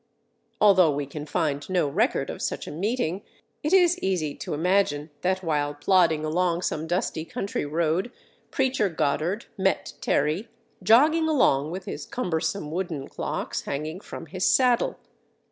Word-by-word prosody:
Although 185 Hz, -7 st, +5 dB
we 145 Hz, 0 st, -2 dB
can 150 Hz, +2 st, -7 dB
find 145 Hz, -2 st, -1 dB
no 180 Hz, -5 st, +2 dB
record 210 Hz, -, 0 dB
of -, -, -8 dB
such -, -, -3 dB
a -, -, -7 dB
meeting, 195 Hz, +1 st, -1 dB, 0.4 s
it 305 Hz, -, -1 dB
is 360 Hz, -2 st, +5 dB
easy 175 Hz, -6 st, -1 dB
to -, -, -5 dB
imagine 160 Hz, -3 st, +1 dB
that 185 Hz, +1 st, 0 dB
while 145 Hz, -3 st, 0 dB
plodding 160 Hz, -1 st, +3 dB
along 175 Hz, +2 st, 0 dB
some 155 Hz, +1 st, -2 dB
dusty 170 Hz, -2 st, -1 dB
country 165 Hz, -2 st, -3 dB
road 165 Hz, +7 st, 0 dB, 0.4 s
Preacher 260 Hz, -6 st, +1 dB
Goddard 165 Hz, +6 st, -1 dB
met 190 Hz, 0 st, 0 dB
Terry 155 Hz, +9 st, 0 dB, 0.3 s
jogging 295 Hz, -, +5 dB
along 150 Hz, -, +3 dB
with 185 Hz, +3 st, -6 dB
his -, -, -6 dB
cumbersome 160 Hz, -6 st, -2 dB
wooden 165 Hz, -5 st, -3 dB
clocks -, -, -3 dB
hanging 155 Hz, +5 st, -4 dB
from -, -, -8 dB
his 180 Hz, +4 st, -5 dB
saddle. 250 Hz, -2 st, +3 dB
175 Hz, 145 wpm, -25 LUFS, 155-200 Hz, 0.4 s, Although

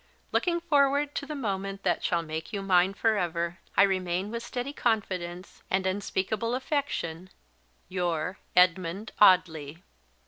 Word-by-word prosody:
"Looking 345 Hz, -2 st, +1 dB
forward 285 Hz, -3 st, +2 dB
to 285 Hz, -, -4 dB
the 300 Hz, -, -4 dB
moment 195 Hz, -5 st, -3 dB
that 175 Hz, -3 st, 0 dB
shall 170 Hz, -1 st, +1 dB
make 160 Hz, +3 st, -5 dB
you 200 Hz, -3 st, -3 dB
mine 190 Hz, 0 st, +3 dB
for 220 Hz, 0 st, +2 dB
ever, 170 Hz, -1 st, -2 dB, 0.2 s
I -, -, +8 dB
remain 185 Hz, 0 st, 0 dB
with 235 Hz, 0 st, -3 dB
steady 245 Hz, +3 st, -4 dB
confidence: 185 Hz, -8 st, -2 dB
and 190 Hz, 0 st, +1 dB
unspeakable 205 Hz, +4 st, -1 dB
affection, 255 Hz, -, -2 dB, 0.6 s
your 180 Hz, -1 st, -2 dB, 0.2 s
"EDMUND 180 Hz, +3 st, +2 dB
AUDLEY." 165 Hz, -5 st, +4 dB
190 Hz, 135 wpm, -28 LUFS, 175-230 Hz, 0.6 s, I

